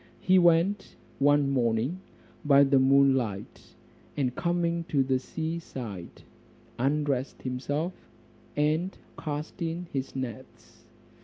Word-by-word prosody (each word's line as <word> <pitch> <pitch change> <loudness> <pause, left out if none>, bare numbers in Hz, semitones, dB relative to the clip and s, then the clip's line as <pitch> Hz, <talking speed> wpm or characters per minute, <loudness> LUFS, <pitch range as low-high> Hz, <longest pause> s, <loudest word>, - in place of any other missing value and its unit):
He 185 0 +4
went 175 +4 +3 0.2
one 145 0 +4
morning 125 +6 0 0.4
by 140 -2 +6
moon 135 0 +5
light, 110 -6 -4 0.4
and 130 -4 0
coming 170 -1 0
to 145 -5 +1
the 130 -1 +1
seaside, 130 - -6 0.6
undressed 140 0 -1
himself, 145 +7 -2 0.6
and 155 +5 +1 0.2
cast 150 +1 -5
in 170 +1 -2
his 135 -1 -3
nets. 130 -4 -8
145 Hz, 100 wpm, -28 LUFS, 130-165 Hz, 0.6 s, by